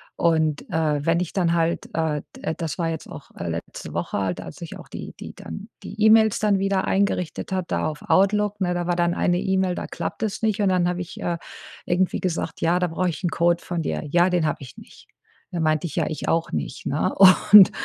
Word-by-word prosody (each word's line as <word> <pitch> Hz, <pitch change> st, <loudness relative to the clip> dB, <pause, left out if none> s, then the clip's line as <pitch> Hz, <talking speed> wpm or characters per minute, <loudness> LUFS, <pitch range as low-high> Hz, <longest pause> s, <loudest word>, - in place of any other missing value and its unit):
Und, 160 Hz, -3 st, +1 dB
äh, 150 Hz, -3 st, 0 dB
wenn 165 Hz, +1 st, +3 dB
ich 180 Hz, -2 st, -3 dB
dann 175 Hz, -3 st, +1 dB
halt, 170 Hz, 0 st, 0 dB
äh 155 Hz, -3 st, -1 dB
d 160 Hz, -, -4 dB
das 165 Hz, 0 st, -4 dB
war 165 Hz, -1 st, 0 dB
jetzt 160 Hz, -1 st, -5 dB
auch, -, -, -10 dB
äh, 85 Hz, -, -4 dB
letzte 85 Hz, 0 st, -6 dB
Woche -, -, -2 dB
halt, 95 Hz, -3 st, -2 dB
als -, -, -10 dB
ich 170 Hz, -, -8 dB
auch -, -, -13 dB
die -, -, -8 dB
die -, -, -9 dB
dann 200 Hz, +3 st, -8 dB
die 215 Hz, -, -8 dB
E-Mails 220 Hz, -1 st, +5 dB
dann 210 Hz, -2 st, +2 dB
wieder 195 Hz, 0 st, 0 dB
eingerichtet 190 Hz, -5 st, -1 dB
habe, 185 Hz, -2 st, -1 dB
da -, -, 0 dB
auf 155 Hz, -1 st, -5 dB
Outlook, 205 Hz, +1 st, +3 dB
ne? 180 Hz, -2 st, 0 dB
Da 175 Hz, 0 st, -2 dB
war 175 Hz, -, +1 dB
dann 175 Hz, 0 st, +1 dB
eine 175 Hz, 0 st, +1 dB
E-Mail, 190 Hz, -1 st, 0 dB
da -, -, -4 dB
klappt -, -, -5 dB
es 215 Hz, -2 st, -2 dB
nicht, 215 Hz, -2 st, +1 dB
und 195 Hz, -, +3 dB
dann 180 Hz, -1 st, +2 dB
habe 180 Hz, 0 st, -2 dB
ich, 175 Hz, -, -8 dB
äh, 170 Hz, -1 st, -1 dB, 0.5 s
irgendwie 180 Hz, +1 st, +1 dB
gesagt: 180 Hz, -3 st, -2 dB
„Ja, 170 Hz, +2 st, +2 dB
da 180 Hz, -, +1 dB
brauche 175 Hz, +2 st, -1 dB
ich 175 Hz, -, -6 dB
'n 175 Hz, -, +1 dB
Code 170 Hz, +1 st, +1 dB
von 175 Hz, -2 st, -3 dB
dir.“ -, -, -2 dB
„Ja, 175 Hz, +4 st, +3 dB
den 175 Hz, -3 st, +2 dB
habe 150 Hz, -, -1 dB
ich 130 Hz, -4 st, -11 dB
nicht.“ -, -, -15 dB, 0.4 s
Da 175 Hz, -, -3 dB
meinte 155 Hz, +1 st, +1 dB
ich: 155 Hz, -, -8 dB
„Ja, 165 Hz, -, +1 dB
ich 155 Hz, -, -5 dB
auch 165 Hz, 0 st, 0 dB
nicht,“ 75 Hz, -2 st, -4 dB
ne? -, -, 0 dB
Und, 195 Hz, +1 st, +8 dB
175 Hz, 235 wpm, -23 LUFS, 160-190 Hz, 0.5 s, Und